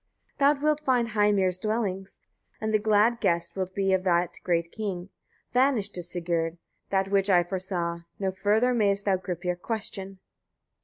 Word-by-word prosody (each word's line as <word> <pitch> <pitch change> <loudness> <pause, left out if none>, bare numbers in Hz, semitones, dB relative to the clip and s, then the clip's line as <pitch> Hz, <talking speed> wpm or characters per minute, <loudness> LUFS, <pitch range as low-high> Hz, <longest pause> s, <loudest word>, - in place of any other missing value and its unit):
Thou 285 +1 +5
wilt 300 +1 0
find 250 -5 +1
Heimir's 205 -4 +2
dwellings, 195 -3 -2 0.4
and 220 0 -2
the 215 - +4
glad 215 +2 +3
guest 170 -4 0
wilt 185 -1 -3
be 195 -1 +1
of 185 -1 +1
that 175 -1 +1
great 170 -1 0
king. 195 -4 -4 0.4
Vanished 250 -6 +2
is, 175 -1 -5
Sigurd! 170 -1 -2 0.3
that 195 0 0
which 200 0 +2
I 175 -2 +5
foresaw; 175 -2 -3 0.2
no 190 -1 -1
further 210 +6 +2
mayest 200 -3 +1
thou 195 -2 +3
Gripir 180 -1 -3
question. 195 -3 -3
195 Hz, 155 wpm, -27 LUFS, 180-215 Hz, 0.4 s, Thou